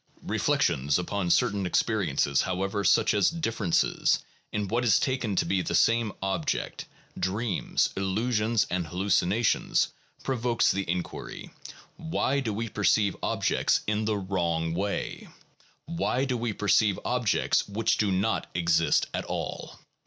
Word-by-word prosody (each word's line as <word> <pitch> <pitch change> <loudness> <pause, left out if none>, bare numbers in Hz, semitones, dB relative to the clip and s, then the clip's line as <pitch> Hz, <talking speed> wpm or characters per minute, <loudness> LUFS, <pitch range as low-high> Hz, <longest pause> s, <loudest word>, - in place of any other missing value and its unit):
Reflection 65 +2 0
upon 90 +1 -2
certain 100 +2 +2
experiences, 70 -5 +1
however, 95 +2 -2
such - - +4
as 100 -2 +3
differ 115 - -3
ences 85 - +2 0.3
in 105 -1 -2
what 120 +4 0
is 110 -5 +4
taken 125 -6 -1
to - - +1
be 95 -1 +1
the - - -2
same 115 -2 +3
object, 95 -5 -2 0.3
dreams, 100 +3 -1
illusions, 110 +3 0
and 90 -3 -1
hallucinations, 95 +5 +1 0.3
provokes 120 -3 +1
the 95 -3 -3
inquiry, 90 0 -5 0.5
Why 160 -4 -1
do 120 -5 -2
we 115 +3 -3
perceive 105 -1 +2
objects - - +1
in 105 +1 0
the 110 -1 0
wrong 85 -4 -1
way; 100 +4 -3 0.6
why 155 -5 -1
do 130 -2 -1
we 120 -1 -2
perceive 105 -1 +2
objects 125 -4 +1
which 105 +3 0
do 105 -2 +2
not 100 +4 0
exist 85 -3 +2
at - - -3
all? - - -5
100 Hz, 135 wpm, -27 LUFS, 95-115 Hz, 0.6 s, such